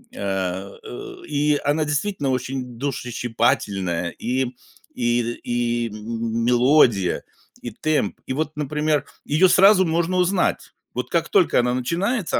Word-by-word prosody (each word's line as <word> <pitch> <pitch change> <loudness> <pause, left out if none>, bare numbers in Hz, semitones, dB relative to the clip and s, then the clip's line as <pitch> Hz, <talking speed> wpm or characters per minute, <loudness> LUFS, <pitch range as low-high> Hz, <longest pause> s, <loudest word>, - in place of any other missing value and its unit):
А, 95 -1 -3
э, 120 - -8
и 150 0 +1
она 150 +2 +1
действительно 145 +1 -1
очень 130 -1 -3
душещипательная 115 -9 -1
и 130 +2 -1 0.5
и 120 0 +1 0.2
и 120 -1 0
м 115 +2 -3
мелодия, 120 - +3 0.4
и 120 - -6
темп, 145 -2 -1
и - - -3
вот 155 +2 -3
например, 150 +1 0 0.2
её 155 +6 +4
сразу 190 +1 +6
можно 170 +2 0
узнать: 180 +1 +1 0.2
вот - - -4
как - - 0
только 405 -5 +4
она 125 0 0
начинается 175 - -1
130 Hz, 125 wpm, -22 LUFS, 115-155 Hz, 0.5 s, сразу